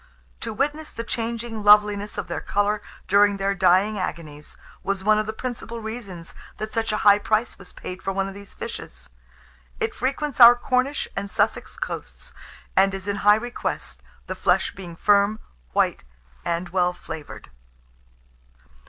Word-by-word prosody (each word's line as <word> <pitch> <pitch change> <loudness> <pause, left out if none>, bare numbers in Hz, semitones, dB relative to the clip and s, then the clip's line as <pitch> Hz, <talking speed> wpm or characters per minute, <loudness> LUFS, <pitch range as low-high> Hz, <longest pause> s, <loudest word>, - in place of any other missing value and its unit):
To 230 - -4
witness 295 +7 -2
the 230 - -5
changing 230 -1 -3
loveliness 210 0 +5
of - - -3
their 170 - -4
colour 205 +1 0 0.3
during 200 0 +4
their 195 0 0
dying 195 +3 +3
agonies, 150 -5 -6 0.2
was 195 -1 -2
one 215 +1 +4
of 215 - -2
the - - -1
principal 235 0 -6
reasons 215 -7 -7 0.2
that 215 0 -5
such 225 -1 0
a 215 - 0
high 205 0 +8
price 220 +3 0
was 180 - -10
paid 185 +1 -8
for 195 - -2
one 195 0 -1
of 195 - -7
these 200 0 -12
fishes. - - -8 0.7
It 445 -1 -1
frequents 280 -3 -2
our 240 0 +11
Cornish 255 +3 0
and 200 - -3
Sussex - - -1
coasts, - - -7 0.4
and 195 0 +4
is 190 +1 -7
in 200 0 -1
high 205 +1 +6
request, 215 - -4 0.2
the - - -4
flesh - - +1
being 175 -3 -9
firm, 205 +3 +3 0.4
white, - - +1 0.4
and 170 +1 -2
well 180 0 +1
flavoured. 155 - -9
205 Hz, 160 wpm, -24 LUFS, 190-230 Hz, 0.7 s, our